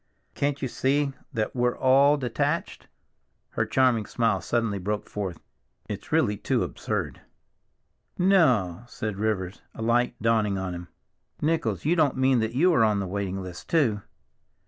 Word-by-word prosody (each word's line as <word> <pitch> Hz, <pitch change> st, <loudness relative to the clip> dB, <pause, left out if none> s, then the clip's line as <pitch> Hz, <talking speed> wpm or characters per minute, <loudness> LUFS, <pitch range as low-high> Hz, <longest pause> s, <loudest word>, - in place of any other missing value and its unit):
"Can't 140 Hz, -1 st, -1 dB
you -, -, +1 dB
see 135 Hz, +3 st, 0 dB, 0.2 s
that 110 Hz, -3 st, -2 dB
we're 125 Hz, 0 st, +1 dB
all 140 Hz, +3 st, +5 dB
detached?" 125 Hz, -4 st, -2 dB, 0.6 s
Her -, -, -1 dB
charming 125 Hz, -5 st, +2 dB
smile 115 Hz, -6 st, +1 dB
suddenly 115 Hz, -1 st, -1 dB
broke 105 Hz, +3 st, -3 dB
forth. 95 Hz, -5 st, -4 dB, 0.5 s
"It's -, -, -7 dB
really 105 Hz, 0 st, +2 dB
too -, -, 0 dB
absurd." -, -, -4 dB, 1.0 s
"No!" 130 Hz, -, +3 dB
said 110 Hz, -5 st, -5 dB
Rivers, 100 Hz, -3 st, -2 dB
a 115 Hz, -, -5 dB
light 120 Hz, +1 st, +1 dB
dawning 110 Hz, -3 st, +1 dB
on 95 Hz, -1 st, -3 dB
him. 90 Hz, 0 st, -7 dB, 0.5 s
"Nichols, 160 Hz, 0 st, -1 dB
you 165 Hz, +3 st, +3 dB
don't 155 Hz, -6 st, +2 dB
mean 130 Hz, -1 st, +3 dB
that 110 Hz, +1 st, -2 dB
you 175 Hz, +6 st, +4 dB
are 125 Hz, -, +4 dB
on 105 Hz, -2 st, +2 dB
the 100 Hz, -, -2 dB
waiting 95 Hz, 0 st, -3 dB
list 90 Hz, -2 st, -9 dB
too?" 120 Hz, -11 st, +2 dB
115 Hz, 150 wpm, -26 LUFS, 100-135 Hz, 1.0 s, all